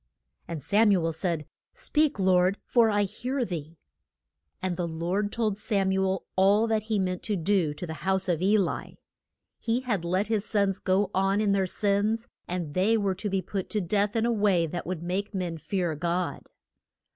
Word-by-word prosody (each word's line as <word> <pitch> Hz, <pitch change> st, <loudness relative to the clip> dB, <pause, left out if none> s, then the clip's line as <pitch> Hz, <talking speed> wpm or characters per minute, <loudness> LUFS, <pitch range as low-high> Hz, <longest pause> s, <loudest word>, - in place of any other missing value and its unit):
And 160 Hz, -5 st, -5 dB
Sam 210 Hz, +7 st, +4 dB
u 180 Hz, -4 st, +2 dB
el 165 Hz, -, 0 dB
said, 160 Hz, -1 st, -2 dB, 0.3 s
Speak, 300 Hz, -1 st, +1 dB
Lord, 185 Hz, 0 st, +3 dB
for 235 Hz, -2 st, +4 dB
I 205 Hz, -1 st, +2 dB
hear 250 Hz, +6 st, -2 dB
thee. 165 Hz, -3 st, -6 dB, 0.8 s
And 185 Hz, -1 st, -2 dB
the 175 Hz, -1 st, -2 dB
Lord 175 Hz, +6 st, -1 dB
told 215 Hz, -3 st, -1 dB
Sam 200 Hz, -3 st, +1 dB
u 190 Hz, 0 st, +1 dB
el 190 Hz, -1 st, -1 dB
all 200 Hz, +4 st, +4 dB
that 220 Hz, -1 st, +1 dB
he 215 Hz, -, +2 dB
meant 185 Hz, -2 st, -1 dB
to 210 Hz, -, -2 dB
do 185 Hz, -2 st, +1 dB
to 180 Hz, -, -5 dB
the 160 Hz, -, -5 dB
house 190 Hz, +2 st, +1 dB
of 175 Hz, -2 st, 0 dB
E 200 Hz, +3 st, +4 dB
li. 195 Hz, -4 st, -2 dB, 0.6 s
He 235 Hz, +2 st, 0 dB
had 220 Hz, -9 st, -1 dB
let 185 Hz, +4 st, 0 dB
his 220 Hz, -2 st, 0 dB
sons 200 Hz, -3 st, +1 dB
go 190 Hz, +1 st, +1 dB
on 195 Hz, +1 st, +2 dB
in 210 Hz, -2 st, +2 dB
their 195 Hz, -1 st, +2 dB
sins, 210 Hz, +4 st, +1 dB, 0.2 s
and 175 Hz, -5 st, -4 dB
they 205 Hz, +5 st, +3 dB
were 200 Hz, -3 st, 0 dB
to 205 Hz, +3 st, -4 dB
be 190 Hz, -1 st, -1 dB
put 190 Hz, +1 st, -4 dB
to 215 Hz, -, 0 dB
death 205 Hz, +3 st, 0 dB
in 225 Hz, 0 st, +2 dB
a 240 Hz, -, +2 dB
way 200 Hz, -6 st, +2 dB
that 175 Hz, +2 st, -5 dB
would 175 Hz, -2 st, -4 dB
make 195 Hz, +4 st, -3 dB
men 175 Hz, -3 st, -3 dB
fear 180 Hz, -1 st, -1 dB
God. 170 Hz, +3 st, -2 dB
195 Hz, 200 wpm, -27 LUFS, 180-210 Hz, 0.8 s, Sam